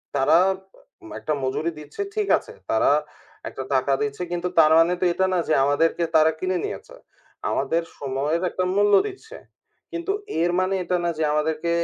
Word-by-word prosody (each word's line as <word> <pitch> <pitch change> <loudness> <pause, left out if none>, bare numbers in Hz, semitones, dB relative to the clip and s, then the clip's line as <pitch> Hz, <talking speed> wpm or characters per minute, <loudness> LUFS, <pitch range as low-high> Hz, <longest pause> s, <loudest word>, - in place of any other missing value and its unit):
তারা 140 +4 +4 0.6
উম 335 - -12
একটা 155 - -2
মজুরি 155 +6 -1
দিচ্ছে, 150 - -8
ঠিক 425 -2 0
আছে। 470 - -11 0.2
তারা 110 - +3 0.6
একটা 130 - -6
টাকা 135 +1 +2
দিচ্ছে 145 +3 -3
কিন্তু 175 0 -2
তার 155 0 +6
মানে 165 +2 +4
তো 185 - +2
এটা 190 - +1
না 180 - +2
যে, 155 - +2
আমাদেরকে 160 +4 +1
তারা 160 0 +5
কিনে 185 +1 -1
নিয়েছে। - - -7 0.5
আমাদের 165 +1 0 0.2
সময়ের 145 +5 -1
একটা 185 - -2
মূল্য 205 0 +3
দিচ্ছে। 440 +4 -10 0.6
কিন্তু 340 +3 -3 0.3
এর 175 - +2
মানে 185 +1 0
এটা 180 0 -1
না 170 - +1
যে, 160 - 0
আমাদেরকে 155 +2 -1
165 Hz, 170 wpm, -23 LUFS, 150-185 Hz, 0.6 s, তার